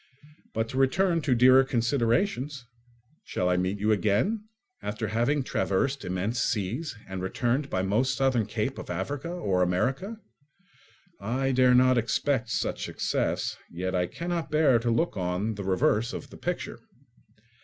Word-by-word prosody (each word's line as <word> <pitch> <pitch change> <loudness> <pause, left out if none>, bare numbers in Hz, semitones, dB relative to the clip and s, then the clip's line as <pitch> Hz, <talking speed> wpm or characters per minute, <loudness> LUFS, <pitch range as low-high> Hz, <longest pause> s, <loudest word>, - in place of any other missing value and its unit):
But 110 0 0
to 130 - -2
return 165 +6 +2
to 140 -4 +2
dearer 130 +2 +7
considerations. 130 - 0 0.6
Shall 90 - -1
I 90 - +3
meet 90 +2 0
you 105 +2 +2
again, 110 - +1 0.4
after 105 0 -3
having 120 +7 +1
traversed 130 +6 0
immense 95 +6 -1
seas, 115 - -2
and 95 -1 -5
returned 120 +9 -1
by 95 - -1
the - - -1
most 130 +6 +1
southern 130 -5 +2
cape 110 +5 -2
of - - -8
Africa 130 - -3
or 100 - 0
America? 135 - 0 1.0
I 130 +6 -1
dare 125 -1 +5
not 130 0 +5
expect 125 +1 0
such - - -2
success, - - -1
yet 95 +2 -3
I 90 -1 +1
cannot 170 - -3
bear 150 -5 +4
to 120 +1 -1
look 115 +3 0
on 90 +4 -1
the 100 -1 -6
reverse 95 +4 +1
of - - -7
the - - -11
picture. - - -4
120 Hz, 155 wpm, -27 LUFS, 100-135 Hz, 1.0 s, dearer